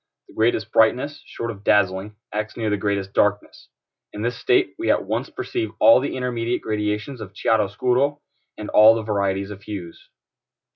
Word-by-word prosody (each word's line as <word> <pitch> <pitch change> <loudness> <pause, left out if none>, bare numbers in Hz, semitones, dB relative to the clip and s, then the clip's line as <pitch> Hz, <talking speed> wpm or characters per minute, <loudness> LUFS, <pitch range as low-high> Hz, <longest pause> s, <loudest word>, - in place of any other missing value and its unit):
The - - -16
greatest 115 +2 0
brightness, 130 +6 +2
short 115 0 -5
of 100 -2 -12
dazzling, 100 0 +1 0.2
acts 105 +1 -4
near 110 -2 -1
the - - +2
greatest 100 -1 -2
darkness. 105 0 -1 0.4
In 105 - -6
this 120 +1 -1
state 380 -2 +1
we 340 - -1
at - - +2
once - - -2
perceive 355 -2 -4
all 285 0 +7
the - - -3
intermediate 120 -2 -2
gradations 105 +4 -3
of 100 -3 -9
chiaro 110 -3 +2
scuro, 130 +8 0 0.4
and 105 - -6
all 110 +1 +7
the 115 - -3
varieties 100 -2 -1
of 100 -1 -9
hues. 95 -5 -9
105 Hz, 175 wpm, -22 LUFS, 100-120 Hz, 0.4 s, all